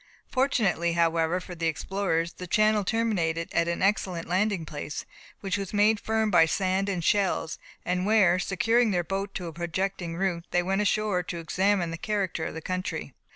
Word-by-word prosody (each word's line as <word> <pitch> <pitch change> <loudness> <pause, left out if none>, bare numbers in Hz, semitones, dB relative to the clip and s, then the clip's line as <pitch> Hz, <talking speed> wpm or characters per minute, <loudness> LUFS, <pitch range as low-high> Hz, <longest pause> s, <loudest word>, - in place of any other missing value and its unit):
Fortunately, 210 - +1
however, 165 +1 +2
for 180 0 -9
the 165 -1 -2
explorers, 170 0 -1
the 180 - -8
channel 215 +2 +3
terminated 180 -7 0
at 170 - +2
an 170 +2 -1
excellent 190 -4 0
landing 190 -1 0
place, 150 -1 -6 0.4
which 195 0 -1
was 195 +1 -5
made 210 +1 +4
firm 220 0 0
by 165 -3 +6
sand 190 +3 0
and 180 -4 -2
shells, 190 -4 +1 0.3
and 180 +1 0
where, 195 -4 +4
securing 225 +5 +2
their 180 -3 +1
boat 195 +3 -3
to 180 - -4
a 165 - -6
projecting 175 +1 -3
root, 175 -3 -1
they 175 - +1
went 195 +3 0
ashore 210 -2 +1
to 175 0 -6
examine 180 +1 +1
the 165 - -4
character 200 -7 -1
of - - -5
the 160 - -5
country. 185 +3 -4
185 Hz, 180 wpm, -27 LUFS, 170-205 Hz, 0.4 s, by